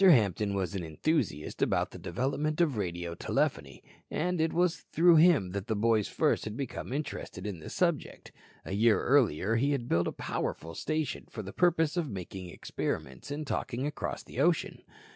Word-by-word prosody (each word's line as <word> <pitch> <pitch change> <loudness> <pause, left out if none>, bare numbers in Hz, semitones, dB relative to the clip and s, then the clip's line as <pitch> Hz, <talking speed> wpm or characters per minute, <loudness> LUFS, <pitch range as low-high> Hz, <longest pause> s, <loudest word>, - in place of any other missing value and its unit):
Hampton 105 - +5
was 95 0 -1
an 95 -3 -3
enthusiast 80 - -1
about - - +1
the - - -9
development 140 - -1
of 160 -7 +3
radio 85 -4 -3
telephony 70 -5 -1 0.3
and 175 +1 0
it 160 0 +2
was 175 -1 +2
through 170 +1 +6
him 155 - +5
the 100 +1 -2
boys 110 0 +2
first - - +1
had 110 +1 -5
become 135 -2 -5
interested 145 -5 -4
in 100 -5 -4
the 80 - -8
subject. 170 -5 -1 0.3
A - - -4
year 105 0 +4
earlier 115 - +3
he 140 +5 +2
had 120 -4 -2
built 85 -4 +2
a - - -1
powerful 80 +1 -4
station 155 - -2
for 110 - -6
the 100 - -8
purpose 165 -2 +2
of 165 -5 0
making 95 -2 -6
experiments 65 -5 -4
in 150 +2 -4
talking 130 -1 -2
across 150 -1 -3
the - - -8
ocean. 165 +3 +1
120 Hz, 175 wpm, -30 LUFS, 95-155 Hz, 0.3 s, through